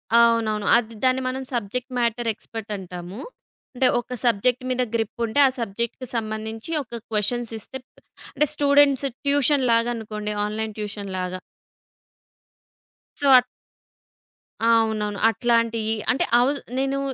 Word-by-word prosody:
అవునవును. 230 Hz, -3 st, +3 dB
అది 230 Hz, -1 st, -3 dB
దాన్ని 260 Hz, 0 st, +3 dB
మనం 260 Hz, +1 st, -3 dB
సబ్జెక్ట్ 240 Hz, +3 st, -3 dB
మ్యాటర్ 235 Hz, 0 st, 0 dB
ఎక్స‌పర్ట్ 220 Hz, 0 st, -8 dB
అంటాము. 180 Hz, +2 st, -8 dB, 0.6 s
అంటే, 255 Hz, +1 st, +3 dB
ఒక 240 Hz, +1 st, -6 dB
సబ్జెక్ట్ 245 Hz, +3 st, +2 dB
మీద 255 Hz, 0 st, 0 dB
గ్రిప్ 225 Hz, 0 st, -2 dB
ఉంటే, 230 Hz, +5 st, -1 dB
ఆ -, -, +3 dB
సబ్జెక్ట్‌కి 235 Hz, +3 st, -3 dB
సంబంధించి 220 Hz, +3 st, -4 dB
ఒక 235 Hz, -2 st, -8 dB
క్వెషన్స్ 225 Hz, +3 st, 0 dB
ఇస్తే 240 Hz, +5 st, -7 dB, 0.6 s
అంటే 300 Hz, +1 st, +2 dB
స్టూడెంట్స్ 280 Hz, -2 st, +4 dB, 0.2 s
ట్యూషన్ 285 Hz, -1 st, +3 dB
లాగా 230 Hz, +1 st, +3 dB
అనుకోండి 210 Hz, -2 st, -5 dB
ఆన్‌లైన్ 215 Hz, +1 st, -3 dB
ట్యూషన్ 205 Hz, -2 st, -5 dB
లాగా. 185 Hz, 0 st, -3 dB, 1.8 s
సో. 285 Hz, -, +1 dB
ఆట్ 250 Hz, -, +3 dB, 1.2 s
అవునవును. 220 Hz, -3 st, +2 dB
అట్లాంటియి 230 Hz, -2 st, +1 dB, 0.2 s
అంటే 255 Hz, -, +1 dB
అవుద్ 275 Hz, +4 st, +2 dB, 0.2 s
నేను 270 Hz, +1 st, 0 dB
230 Hz, 125 wpm, -23 LUFS, 215-255 Hz, 1.8 s, స్టూడెంట్స్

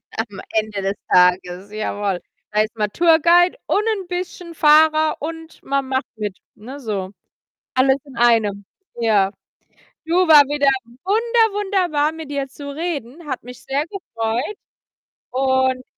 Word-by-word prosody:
Am 220 Hz, -3 st, -4 dB
Ende 215 Hz, -2 st, -1 dB
des 195 Hz, +1 st, 0 dB, 0.2 s
Tages, 180 Hz, +2 st, +3 dB
jawoll. 205 Hz, -3 st, -2 dB, 0.3 s
Da 210 Hz, -, +3 dB
ist 215 Hz, +1 st, -3 dB
man 210 Hz, -2 st, -1 dB
Tour-Guide 340 Hz, -, +4 dB
und 415 Hz, -, +2 dB
'n 400 Hz, -5 st, -1 dB
bisschen 355 Hz, -1 st, -5 dB
Fahrer 310 Hz, +1 st, +5 dB
und 325 Hz, +1 st, -7 dB
man 275 Hz, -1 st, -1 dB
macht 265 Hz, +1 st, -1 dB
mit, 210 Hz, -3 st, -4 dB, 0.2 s
ne, 260 Hz, +7 st, -10 dB
so. 200 Hz, -7 st, -4 dB, 0.6 s
Alles 265 Hz, +1 st, +3 dB
in 265 Hz, -3 st, -14 dB
einem. 220 Hz, -4 st, +2 dB, 0.3 s
Ja. 205 Hz, -4 st, +3 dB, 0.7 s
Du, 335 Hz, +2 st, -1 dB
war 305 Hz, -2 st, +9 dB
wieder 285 Hz, 0 st, 0 dB, 0.4 s
wunder 450 Hz, +2 st, +2 dB
wunderbar, 355 Hz, -7 st, +1 dB
mit 320 Hz, -3 st, -8 dB
dir 280 Hz, -1 st, -2 dB
zu 285 Hz, +2 st, -9 dB
reden. 310 Hz, -2 st, -5 dB
Hat 260 Hz, -, -4 dB
mich 250 Hz, 0 st, -11 dB
sehr 275 Hz, +2 st, -1 dB
gefreut 245 Hz, -, -3 dB, 0.7 s
und 260 Hz, 0 st, +1 dB
270 Hz, 140 wpm, -20 LUFS, 215-325 Hz, 0.7 s, war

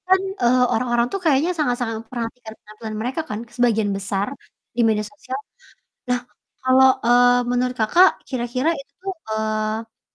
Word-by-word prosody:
Kan, 375 Hz, 0 st, +4 dB, 0.2 s
eee, 245 Hz, +1 st, +4 dB
orang-orang 240 Hz, 0 st, +1 dB
tuh 390 Hz, -, -1 dB
kayaknya 300 Hz, +2 st, +3 dB
sangat-sangat 245 Hz, -6 st, 0 dB
memperhatikan 230 Hz, 0 st, -6 dB
penampilan 215 Hz, +1 st, -9 dB
mereka 255 Hz, +7 st, -2 dB
kan, 210 Hz, -, -3 dB, 0.2 s
sebagian 225 Hz, -4 st, +2 dB
besar, 200 Hz, 0 st, -2 dB, 0.5 s
di 240 Hz, -, +2 dB
media 215 Hz, -1 st, +1 dB
sosial. 265 Hz, -2 st, -6 dB, 0.7 s
Nah, 250 Hz, 0 st, +2 dB, 0.4 s
kalau, 260 Hz, 0 st, +6 dB, 0.2 s
eee, 245 Hz, +1 st, +5 dB
menurut 250 Hz, 0 st, 0 dB
Kakak, 340 Hz, -, +6 dB, 0.2 s
kira-kira 255 Hz, +3 st, -1 dB
itu 275 Hz, +1 st, -16 dB
tuh 385 Hz, 0 st, -3 dB, 0.2 s
eee, 220 Hz, +1 st, -2 dB
245 Hz, 140 wpm, -22 LUFS, 220-260 Hz, 0.7 s, kalau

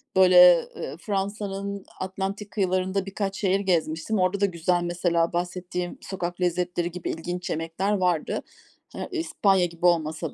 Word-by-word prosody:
böyle, 180 Hz, -2 st, +7 dB
eee, 135 Hz, -, -5 dB
Fransa'nın 200 Hz, 0 st, -3 dB
Atlantik 195 Hz, +2 st, -4 dB
kıyılarında 190 Hz, -1 st, 0 dB
birkaç 195 Hz, 0 st, -3 dB
şehir 195 Hz, -1 st, +2 dB
gezmiştim. 170 Hz, +1 st, 0 dB
Orada 185 Hz, +2 st, +1 dB
da -, -, +5 dB
güzel 175 Hz, -1 st, 0 dB
mesela 175 Hz, -1 st, 0 dB
bahsettiğim 180 Hz, 0 st, -3 dB
sokak 180 Hz, -1 st, -5 dB
lezzetleri 175 Hz, 0 st, 0 dB
gibi 175 Hz, 0 st, -5 dB
ilginç 175 Hz, +2 st, -4 dB
yemekler 165 Hz, +5 st, -2 dB
vardı. 180 Hz, -5 st, 0 dB, 0.5 s
Ha, -, -, -5 dB
İspanya 200 Hz, -, +2 dB
gibi 170 Hz, 0 st, -5 dB
olmasa 160 Hz, -2 st, +1 dB
180 Hz, 135 wpm, -25 LUFS, 175-195 Hz, 0.5 s, böyle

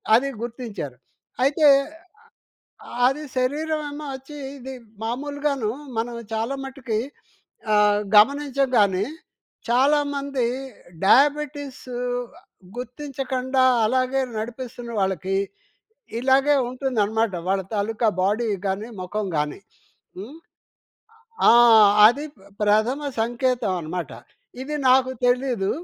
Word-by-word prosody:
అది 275 Hz, +4 st, +2 dB
గుర్తించారు. 225 Hz, -, -6 dB, 0.5 s
అయితే 295 Hz, +3 st, +3 dB, 1.4 s
అది 295 Hz, +3 st, -1 dB
శరీరమేమో 300 Hz, +2 st, -2 dB
వచ్చి 270 Hz, +3 st, -11 dB, 0.2 s
ఇది 265 Hz, +1 st, -8 dB, 0.3 s
మామూలుగాను 280 Hz, 0 st, -2 dB, 0.3 s
మనం 235 Hz, +1 st, -2 dB, 0.2 s
చాలా 225 Hz, +5 st, -1 dB
మట్టి‌కి 255 Hz, -5 st, -3 dB, 0.8 s
ఆహ్, 210 Hz, 0 st, +4 dB, 0.2 s
గమనిచంగాని, 255 Hz, -6 st, +3 dB, 0.6 s
చాలామంది 280 Hz, 0 st, +1 dB, 0.6 s
డయాబిటిస్ 285 Hz, +2 st, +2 dB, 0.9 s
గుర్తించకుండా 260 Hz, 0 st, -2 dB, 0.2 s
అలాగే 255 Hz, +2 st, +1 dB, 0.2 s
నడిపిస్తున్న 240 Hz, +1 st, -6 dB
వాళ్ళకి 190 Hz, 0 st, -1 dB, 0.8 s
ఇలాగే 270 Hz, +3 st, +4 dB
ఉంటుందన్నమాట. 225 Hz, -5 st, -1 dB
వాళ్ళ 195 Hz, 0 st, +1 dB
తాలూకా 220 Hz, +2 st, 0 dB
బాడీ 215 Hz, +5 st, +1 dB, 0.2 s
గాని, 200 Hz, +4 st, -2 dB
మొఖం 200 Hz, +3 st, -3 dB
గాని 150 Hz, +4 st, -2 dB, 0.6 s
హ్మ్. 240 Hz, +11 st, -9 dB, 1.1 s
ఆ! -, -, +9 dB, 0.6 s
అది 280 Hz, +6 st, +2 dB
ప -, -, -23 dB, 0.2 s
ప్రథమ 215 Hz, +6 st, +2 dB, 0.2 s
సంకేతమన్నమాట. 215 Hz, -, -1 dB, 0.5 s
ఇది 300 Hz, +3 st, -5 dB
నాకు 260 Hz, 0 st, +4 dB, 0.2 s
తెలీదు. 245 Hz, -5 st, +1 dB
250 Hz, 85 wpm, -23 LUFS, 215-275 Hz, 1.4 s, ఆ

